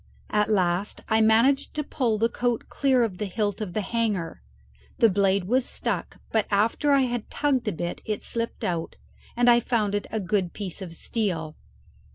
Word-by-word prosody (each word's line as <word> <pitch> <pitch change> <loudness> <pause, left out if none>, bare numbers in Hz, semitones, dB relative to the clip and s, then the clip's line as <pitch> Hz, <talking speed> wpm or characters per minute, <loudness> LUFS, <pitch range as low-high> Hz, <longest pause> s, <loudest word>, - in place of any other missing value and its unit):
At 210 0 +2
last 185 -1 0
I 220 0 +3
managed 230 +6 +3
to 300 - -1
pull 245 -6 0
the 225 +2 +3
coat 240 0 -2
clear 265 -3 +2
of 195 -6 -3
the 210 - -2
hilt 205 +2 -2
of 195 -5 -4
the 215 - 0
hanger; 210 -6 -2 0.6
the 230 - +5
blade 195 0 +2
was 250 +8 +2
stuck, - - -3
but 220 -2 +1
after 220 +8 +2
I 275 -1 +5
had 245 -3 -2
tugged 270 -6 0
a - - +2
bit 175 0 -4
it 215 -1 -3
slipped 230 0 -4
out, 170 -2 -2 0.4
and 245 0 +3
I 240 0 +7
found 220 -4 0
it 205 - -2
a 220 - -2
good 185 -2 -1
piece 200 -2 -6
of 170 -3 -7
steel. 165 -8 -2
215 Hz, 190 wpm, -25 LUFS, 195-235 Hz, 0.6 s, I